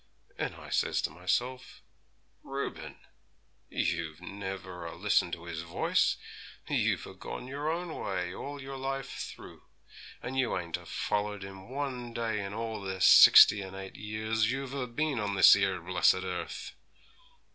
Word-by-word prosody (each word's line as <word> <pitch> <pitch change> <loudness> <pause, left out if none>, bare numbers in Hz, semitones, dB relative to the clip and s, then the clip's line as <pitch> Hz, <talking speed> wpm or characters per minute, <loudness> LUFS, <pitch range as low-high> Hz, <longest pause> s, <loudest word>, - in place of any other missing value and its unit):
And - - -2
I - - -11
says - - +1
to - - -1
myself, 105 - -2 0.6
"Reuben! 135 0 -5 0.7
you've 80 -1 -2
never 95 -2 -6
a 80 - -8
listened - - +1
to 85 - -5
His 80 -2 -5
voice; 85 -1 +1 0.5
you've - - +1
a - - -10
gone - - -7
your 145 +3 -3
own 170 0 -3
way 90 -2 -3
all 145 +7 -6
your 135 0 -7
life 135 0 -3
through, - - -8 0.6
and 130 +2 -3
you 130 - +1
ain't 85 -2 -3
a - - -14
follered 105 -1 -2
Him 95 +1 -10
one 130 -3 -4
day 110 -3 -2
in 100 - -5
all 110 0 -4
the 95 -1 -4
sixty 105 +3 +9
and 95 0 -8
eight 95 0 -8
years 110 +2 -1
you've 135 0 -4
a 135 -3 -3
bin 140 +2 -1
on 100 -1 -1
this 95 - +9
'ere 95 -2 +1
blessed 90 +2 +3
earth!" 90 -1 -5
105 Hz, 155 wpm, -30 LUFS, 95-130 Hz, 0.7 s, sixty